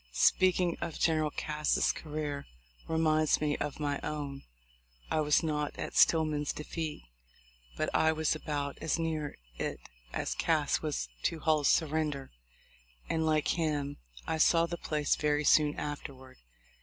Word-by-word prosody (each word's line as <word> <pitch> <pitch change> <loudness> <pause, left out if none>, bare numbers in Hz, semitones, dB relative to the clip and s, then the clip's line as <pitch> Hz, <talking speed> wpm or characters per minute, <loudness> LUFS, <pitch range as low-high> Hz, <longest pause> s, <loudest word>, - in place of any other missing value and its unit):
Speak 185 - +4
ing 175 -2 0
of 170 -2 -4
General 155 -2 +2
Cass's 150 0 0
career, 150 -2 -5 0.4
reminds 155 -1 +2
me 150 -1 0
of 145 0 -4
my 145 -2 -1
own. 145 -2 -4 0.7
I - - +2
was 150 +2 +3
not 150 -2 -2
at - - -5
Stillman's 155 -3 +3
defeat, 155 0 -5 0.7
but - - 0
I 160 - +4
was 160 0 +1
about 145 -2 -3
as 160 - 0
near 160 -3 -2 0.2
it - - -2 0.3
as - - -2
Cass - - +1
was - - -2
to 160 - -1
Hull's 155 -3 +3
surrender; 150 -3 0 0.8
and, 160 -1 +1
like 155 -1 +2
him, 145 -3 -1 0.3
I 160 - -2
saw 165 +1 +5
the 170 +1 -4
place 150 -3 0
very 150 0 +1
soon 150 0 +4
afterward. 135 -3 -7
150 Hz, 145 wpm, -31 LUFS, 145-160 Hz, 0.8 s, saw